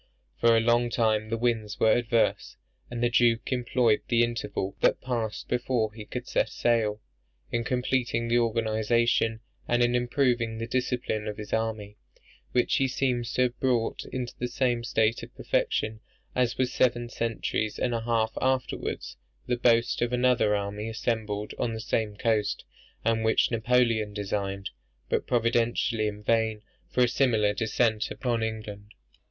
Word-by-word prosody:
For 115 -1 +5
a - - +3
long 120 +1 +3
time 110 -2 +1
the 115 - -1
winds 115 -3 -1
were 110 - +5
adverse; 120 -1 +1 0.3
and 120 0 -3
the 120 - +3
Duke 120 0 +2
employed 120 -3 +2
the 120 -1 +3
interval 105 -4 -3
that - - +3
passed 115 -4 -3
before 120 -3 0
he 110 -1 -9
could 125 +3 -6
set - - +1
sail 110 -3 +1 0.5
in 120 0 0
completing 125 -1 0
the 120 +1 +3
organization 115 0 +1 0.3
and 120 0 +3
in 120 0 +2
improving 120 -2 +1
the 115 - -3
discipline 120 -3 -2
of 105 - -4
his 105 0 -7
army; 110 -2 -2 0.5
which 125 - +2
he 135 - +2
seems 125 -2 -1
to 125 - +3
have 120 -1 -2
brought 125 -4 0
into 125 -2 -4
the 125 - -1
same 120 -2 0
state 115 -1 +1
of - - -11
perfection, 110 0 -1 0.3
as 125 -2 0
was 130 -1 0
seven 120 -1 +2
centuries 115 -2 -2
and 125 - 0
a 115 - -1
half 115 -1 +1
afterwards 130 - -2 0.3
the 125 - 0
boast 115 -1 +2
of 120 0 +1
another 125 -4 +3
army 105 +2 -3
assembled 110 -2 -2
on 115 -1 -1
the - - -5
same 110 -2 -1
coast, 110 -3 0 0.4
and 115 -1 +2
which 110 +2 +3
Napoleon 115 -2 +1
designed 100 -1 -3 0.4
(but - - 0
providentially 115 -1 +1
in 105 0 -6
vain) 110 -1 +1 0.3
for 125 - +2
a - - +4
similar 115 -5 +2
descent 110 +1 0
upon 120 -3 -2
England. 105 -2 -5
115 Hz, 160 wpm, -27 LUFS, 110-120 Hz, 0.5 s, For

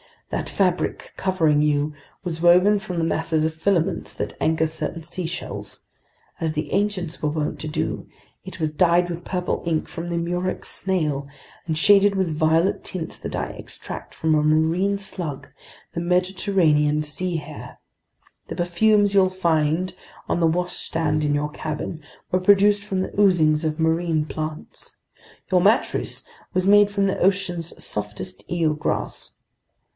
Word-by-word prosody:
That - - -2
fabric 180 -3 0
covering 165 -6 +2
you 150 0 +1 0.3
was 165 -3 -4
woven 180 +4 +6
from 190 -4 -6
the 165 - +1
masses 160 -1 0
of 160 - -1
filaments 170 +1 0
that - - -3
anchor 160 0 +2
certain 160 +1 -4
seashells; 170 0 -5 0.6
as 160 -3 -1
the 150 -1 -3
ancients 195 -5 -1
were 150 - +1
wont 150 0 -2
to 155 - -4
do, 150 - -3 0.4
it - - -9
was 155 -2 0
dyed 175 +2 +3
with 170 +1 -6
purple 180 -1 -2
ink 160 -2 0
from 170 0 -6
the 170 - -1
murex 175 +2 -2
snail 150 -7 -1 0.4
and 160 -2 -1
shaded 200 +3 +5
with 185 -4 0
violet 160 +4 +2
tints 175 -3 -5
that - - -5
I - - -2
extract - - -8
from 160 -1 +1
a 155 - +4
marine 160 +6 +2
slug, 175 -7 -5 0.4
the - - -3
Mediterranean 175 -4 +2
sea 170 +4 -2
hare. 155 - -7 0.7
The - - -5
perfumes 205 +4 +3
you'll 190 -2 +5
find 170 -1 +1 0.4
on - - +1
the 165 - +4
washstand 160 -3 -1
in 145 0 +2
your 150 +1 -1
cabin 155 +1 -5 0.3
were 185 - +3
produced 205 +2 +4
from 195 -2 -2
the - - -3
oozings 165 -6 +4
of 155 0 -1
marine 160 -1 +1
plants. 155 +1 -6 0.6
Your 180 -1 +4
mattress 210 +6 +2 0.3
was 185 0 +1
made 205 +1 +6
from 200 -1 +1
the 195 - 0
ocean's 180 -3 0
softest 105 -3 -5
eelgrass. 160 -3 -1
170 Hz, 150 wpm, -23 LUFS, 155-185 Hz, 0.7 s, woven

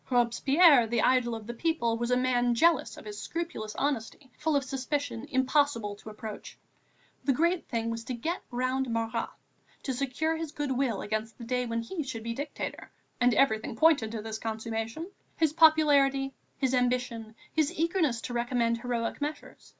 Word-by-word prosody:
Robespierre, 260 +3 +5
the 230 0 +1
idol 245 -2 +3
of 220 -1 -8
the 235 - -5
people, 240 -4 0
was 235 +1 -2
a 250 - +3
man 245 -1 +2
jealous 315 -6 +3
of - - -11
his 210 -1 -7
scrupulous 335 -11 -4
honesty, 265 -1 -3
full 310 0 0
of 280 - +2
suspicion, 270 -1 -3
impossible 260 -6 +1
to 210 - -11
approach. 215 0 -8 0.7
The 270 +1 +3
great 340 +5 +1
thing 230 -1 -2
was 230 0 -4
to 250 - -3
get 325 +10 -3
round 255 +1 -1
Marat, 230 0 -1 0.5
to 265 - -2
secure 275 +5 -1
his 320 -2 -5
good 290 -2 -2
will 255 -6 0
against 220 +1 -3
the 235 - -9
day 250 +1 -1
when 230 0 -2
he 330 +8 -4
should 230 -6 -5
be 230 0 -3
dictator 285 +4 -5 0.3
and 245 -2 +4
everything 220 -4 +2
pointed 285 -6 +4
to 220 -2 -4
this 220 0 -5
consummation, 225 - -4 0.3
his 315 -2 +2
popularity, 285 -4 +4 0.2
his 265 -2 0
ambition, 245 -3 0 0.2
his 310 -2 +2
eagerness 325 -7 0
to 245 - -5
recommend 235 -1 0
heroic 240 +1 -2
measures. 300 +1 -6
250 Hz, 175 wpm, -29 LUFS, 230-290 Hz, 0.7 s, Robespierre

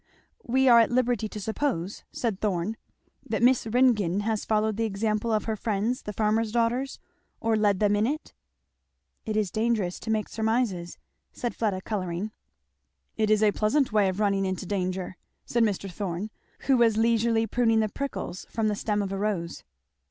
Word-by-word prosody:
'" - - -38
"We 265 0 +4
are 235 -2 +8
at 225 - +4
liberty 245 -3 +1
to 210 - -7
suppose," 210 - -2
said 225 -6 -2
Thorn, 200 0 -1 0.5
"that - - -2
Miss 250 -2 +4
Ringgan 215 -6 +3
has 220 0 -1
followed 215 0 +1
the 225 - -1
example 215 +1 -1
of 215 -1 +1
her 220 - -2
friends 215 +3 -1
the 210 - -5
farmers' 215 +1 +1
daughters? 240 +4 0 0.4
or 225 0 +1
led 205 -3 +2
them 205 -1 +3
in 210 +2 +2
it? 305 +4 -4 0.5
" - - -51
"It 215 -1 -1
is 210 -4 0
dangerous 215 -5 0
to 225 - -7
make 215 -1 0
surmises," 220 -6 -1 0.3
said 240 - -4
Fleda 205 -5 -1
colouring. 190 0 -3 0.8
"It 215 -1 +1
is 215 0 +4
a 210 - +5
pleasant 235 +5 +1
way 205 -3 +4
of 185 +2 -4
running 200 -2 +2
into 185 +1 -3
danger," 185 -1 -3 0.3
said 235 - 0
Mr. 205 -3 +1
Thorn, 190 +2 -4 0.3
who 270 -2 +3
was 230 -2 +4
leisurely 225 0 +2
pruning 225 0 +2
the 215 - +1
prickles 270 -6 -5
from 220 -1 0
the 210 - 0
stem 205 0 -1
of 195 - -4
a 195 - -3
rose. 195 -5 -2
215 Hz, 180 wpm, -27 LUFS, 200-230 Hz, 0.8 s, are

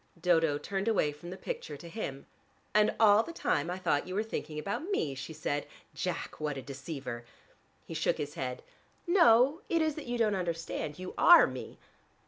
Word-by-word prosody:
Dodo 165 -4 +3
turned 195 +6 -3
away 195 -9 +2
from 150 +4 -10
the 185 - -7
picture 485 - -5
to 170 - -11
him. 165 -8 -5 0.5
"And 210 0 +4
all 215 -1 +7
the 335 - -7
time 165 - 0
I 180 - -2
thought 170 -6 0
you 185 - -5
were 210 - +1
thinking 155 -8 -5
about 200 - -3
me!" 155 - 0
she 135 +3 -7
said. 145 -2 -3 0.3
"Jack, - - -4
what 150 -2 -2
a - - -4
deceiver!" 135 -3 -6 0.6
He - - -7
shook 165 +1 +1
his 145 -1 -4
head. 125 -1 -4 0.4
"No: 280 - +5
it 335 - +2
is 315 -1 +1
that 305 - -8
you 245 0 -1
don't 220 -3 +2
understand. 165 -4 -3
You 185 0 -7
are 345 - +9
me. - - -7
175 Hz, 190 wpm, -31 LUFS, 150-225 Hz, 0.6 s, are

